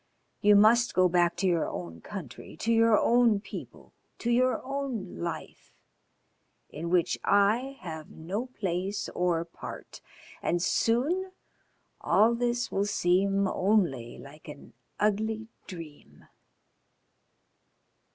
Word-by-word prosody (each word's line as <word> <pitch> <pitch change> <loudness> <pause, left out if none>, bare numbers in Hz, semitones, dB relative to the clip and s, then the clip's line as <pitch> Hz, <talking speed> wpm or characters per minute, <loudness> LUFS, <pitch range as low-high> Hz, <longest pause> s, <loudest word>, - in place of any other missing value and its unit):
You 205 0 +6
must 230 +4 +5
go 185 0 +5
back 175 -1 +2
to 195 - 0
your 170 -3 +1
own 85 -2 -7
country, 165 - -9
to 230 +7 0
your 225 -1 +5
own 235 -3 +4
people, 200 - -10 0.2
to 240 - -2
your 255 +1 +2
own 265 -8 -4
life, 165 -2 -6 1.0
in 165 +3 -5
which 175 -1 +1
I 225 +7 +2
have 160 -3 -7
no 195 +10 -5
place 200 -2 -3
or 175 -2 0
part, 165 - -10 0.4
and 175 - 0
soon 285 - +1 0.7
all 225 +3 +3
this 240 0 -1
will 200 +1 0
seem 195 +1 +2
only 180 - 0
like 150 +4 -13
an 145 -5 -11 0.3
ugly 220 +1 0 0.2
dream." 165 -6 -11
200 Hz, 115 wpm, -28 LUFS, 170-230 Hz, 1.0 s, You